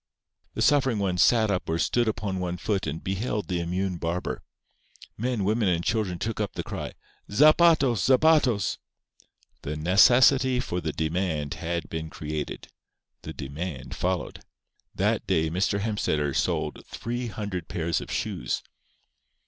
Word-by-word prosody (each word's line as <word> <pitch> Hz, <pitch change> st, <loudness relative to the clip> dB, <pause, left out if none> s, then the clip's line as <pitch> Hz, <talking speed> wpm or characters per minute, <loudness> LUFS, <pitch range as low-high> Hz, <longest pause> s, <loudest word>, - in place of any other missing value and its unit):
The -, -, 0 dB
suffering 135 Hz, -5 st, +3 dB
ones 95 Hz, -3 st, 0 dB
sat 110 Hz, -3 st, +4 dB
up 90 Hz, -4 st, -2 dB
or 80 Hz, -, +1 dB
stood 120 Hz, +7 st, +1 dB
upon 100 Hz, -3 st, -2 dB
one 90 Hz, -1 st, -3 dB
foot 100 Hz, -1 st, -1 dB
and 75 Hz, +3 st, -4 dB
beheld 105 Hz, +2 st, -2 dB
the 90 Hz, -2 st, -1 dB
immune 90 Hz, +2 st, -2 dB
barber. 85 Hz, +2 st, -3 dB, 0.7 s
Men, 120 Hz, -2 st, -1 dB
women 105 Hz, +2 st, +1 dB
and 85 Hz, -1 st, 0 dB
children 105 Hz, -5 st, 0 dB
took 110 Hz, +5 st, -3 dB
up 105 Hz, -2 st, -2 dB
the -, -, -4 dB
cry: -, -, -5 dB, 0.4 s
"Zapatos! 150 Hz, -, +5 dB
zapatos!" 130 Hz, -, +3 dB, 0.8 s
The 75 Hz, -, -4 dB
necessity 125 Hz, -, +5 dB
for 90 Hz, -7 st, -3 dB
the 80 Hz, -1 st, -2 dB
demand 80 Hz, -2 st, -1 dB
had 85 Hz, 0 st, -3 dB
been 80 Hz, -1 st, -5 dB
created. 75 Hz, -1 st, -5 dB, 0.5 s
The -, -, -7 dB
demand 70 Hz, +1 st, -6 dB
followed. 90 Hz, -2 st, -2 dB, 0.5 s
That -, -, 0 dB
day 80 Hz, 0 st, +1 dB
Mr. 100 Hz, +3 st, 0 dB
Hemstetter 75 Hz, -10 st, 0 dB
sold -, -, -1 dB
three 120 Hz, +1 st, -4 dB
hundred 100 Hz, -6 st, -5 dB
pairs 85 Hz, -1 st, -1 dB
of -, -, -9 dB
shoes. -, -, -2 dB
95 Hz, 140 wpm, -26 LUFS, 85-115 Hz, 0.8 s, Zapatos